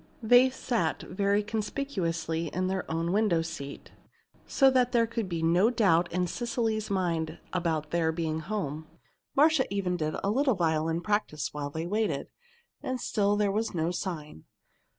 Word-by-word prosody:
They 245 Hz, +3 st, +6 dB
sat 235 Hz, -, -1 dB
very 200 Hz, +2 st, +1 dB
conspicuously 195 Hz, -, -2 dB
in 185 Hz, +4 st, -2 dB
their 190 Hz, 0 st, -2 dB
own 165 Hz, +1 st, -1 dB
window 195 Hz, -5 st, +2 dB
seat, 150 Hz, -4 st, -7 dB, 0.6 s
so 270 Hz, -1 st, +4 dB
that 250 Hz, -1 st, +2 dB
there 235 Hz, -1 st, +4 dB
could 230 Hz, -3 st, -3 dB
be 165 Hz, -2 st, -2 dB
no 175 Hz, +6 st, +4 dB
doubt 180 Hz, -8 st, +2 dB
in 180 Hz, +1 st, +1 dB
Cecily's 225 Hz, +1 st, -2 dB
mind 170 Hz, -5 st, -1 dB, 0.2 s
about 160 Hz, -4 st, -1 dB
their 165 Hz, -1 st, +2 dB
being 160 Hz, -1 st, -2 dB
at -, -, -8 dB
home. 160 Hz, -7 st, -3 dB, 0.5 s
Marcia 295 Hz, -3 st, +4 dB
even 185 Hz, -3 st, -1 dB
did 155 Hz, -2 st, -2 dB
a 200 Hz, -, +1 dB
little 260 Hz, +1 st, +2 dB
violin 165 Hz, -1 st, 0 dB
practice 190 Hz, -, -1 dB
while 145 Hz, -1 st, -3 dB
they 160 Hz, +3 st, -4 dB
waited. 200 Hz, -6 st, -1 dB, 0.5 s
And 255 Hz, -1 st, -3 dB
still 205 Hz, -3 st, +1 dB
there 205 Hz, -1 st, +1 dB
was 215 Hz, 0 st, -1 dB
no 165 Hz, +1 st, 0 dB
sign. 160 Hz, -, -5 dB
185 Hz, 160 wpm, -28 LUFS, 165-220 Hz, 0.6 s, They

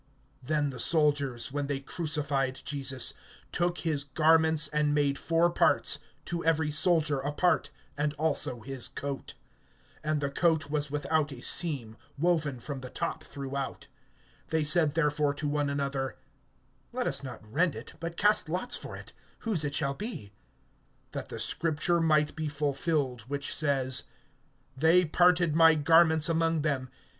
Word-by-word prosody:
(23)Then 150 Hz, -2 st, 0 dB
the 125 Hz, -, -9 dB
soldiers, 140 Hz, -4 st, +2 dB
when 145 Hz, 0 st, -3 dB
they 140 Hz, -1 st, -2 dB
crucified 140 Hz, -3 st, -2 dB
Jesus, 140 Hz, -2 st, -1 dB, 0.4 s
took 175 Hz, 0 st, 0 dB
his 155 Hz, -4 st, -1 dB
garments, 160 Hz, +2 st, +3 dB
and 150 Hz, 0 st, +1 dB
made 145 Hz, -2 st, +1 dB
four 165 Hz, +1 st, +2 dB
parts, -, -, +3 dB, 0.3 s
to 170 Hz, -1 st, -3 dB
every 160 Hz, -2 st, +1 dB
soldier 150 Hz, -2 st, +2 dB
a 140 Hz, +2 st, -3 dB
part, 175 Hz, +4 st, +1 dB, 0.3 s
and 150 Hz, 0 st, 0 dB
also 145 Hz, -6 st, +1 dB
his 130 Hz, +1 st, -5 dB
coat. 140 Hz, -1 st, -6 dB, 0.7 s
And 155 Hz, 0 st, 0 dB
the 140 Hz, -1 st, -2 dB
coat 160 Hz, -1 st, +1 dB
was 145 Hz, -1 st, 0 dB
without 150 Hz, +1 st, -1 dB
a 125 Hz, -3 st, -9 dB
seam, 130 Hz, -11 st, +3 dB, 0.2 s
woven 155 Hz, -5 st, 0 dB
from 140 Hz, +2 st, -6 dB
the 130 Hz, -, -8 dB
top -, -, -4 dB
throughout. 140 Hz, -1 st, -6 dB, 0.6 s
(24)They 160 Hz, -1 st, 0 dB
said 155 Hz, -1 st, +4 dB
therefore 150 Hz, -2 st, +1 dB
to 145 Hz, +1 st, -3 dB
one 145 Hz, -1 st, 0 dB
another: 140 Hz, -2 st, -3 dB, 0.7 s
Let 250 Hz, 0 st, -2 dB
us -, -, 0 dB
not 125 Hz, -5 st, -9 dB
rend 170 Hz, +10 st, 0 dB
it, -, -, -9 dB
but 170 Hz, 0 st, -6 dB
cast 210 Hz, -4 st, +3 dB
lots 185 Hz, +9 st, 0 dB
for -, -, -6 dB
it, -, -, -12 dB, 0.3 s
whose 210 Hz, -9 st, 0 dB
it 145 Hz, -1 st, -2 dB
shall 140 Hz, -3 st, 0 dB
be; 140 Hz, -, -7 dB, 0.8 s
that -, -, -6 dB
the -, -, -7 dB
scripture 165 Hz, +1 st, 0 dB
might 155 Hz, -2 st, +2 dB
be 160 Hz, -1 st, -3 dB
fulfilled 145 Hz, -3 st, -1 dB
which 140 Hz, +1 st, -2 dB
says: 135 Hz, -4 st, +1 dB, 0.7 s
They 165 Hz, +6 st, +4 dB
parted 175 Hz, 0 st, +3 dB
my 160 Hz, -1 st, +6 dB
garments 160 Hz, +1 st, +4 dB
among 165 Hz, -2 st, +1 dB
them. 135 Hz, -4 st, -1 dB
150 Hz, 150 wpm, -29 LUFS, 140-165 Hz, 0.8 s, my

